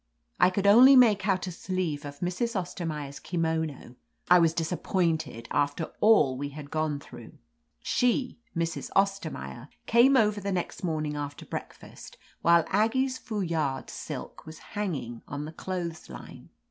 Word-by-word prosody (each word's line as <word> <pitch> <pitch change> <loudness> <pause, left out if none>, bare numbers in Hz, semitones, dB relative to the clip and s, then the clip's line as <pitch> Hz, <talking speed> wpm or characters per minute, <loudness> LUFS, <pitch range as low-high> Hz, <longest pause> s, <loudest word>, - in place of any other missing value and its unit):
I 180 - +6
could 195 +1 -2
only 245 +7 +8
make 215 -6 +5
out 190 -2 +1
a 185 - -5
sleeve 170 -5 -3
of 145 0 -9
Mrs. 185 +7 -2
Ostermaier's 155 -6 -5
kimono. 160 -7 -3 0.3
I 180 - +9
was 165 -2 +4
disappointed 160 -7 -1
after 145 +3 0
all 210 -12 +5
we 140 +2 -4
had 145 0 -10
gone 155 -2 -1
through. - - -12 0.5
She 250 0 0
— 230 - -39
Mrs. 165 0 -2
Ostermaier— 180 - -1 0.2
came 250 +4 +5
over 210 -3 +2
the 200 +1 -2
next 180 0 -3
morning 155 -3 -2
after 145 -1 -6
breakfast, - - -9 0.2
while 170 -1 +5
Aggie's 255 +6 +1
foulard 165 - -2
silk - - -7
was 160 0 -10 0.2
hanging 150 - -3
on 145 +1 -5
the 155 - -8
clothes 170 -3 -5
line. - - -11
170 Hz, 145 wpm, -28 LUFS, 150-200 Hz, 0.5 s, I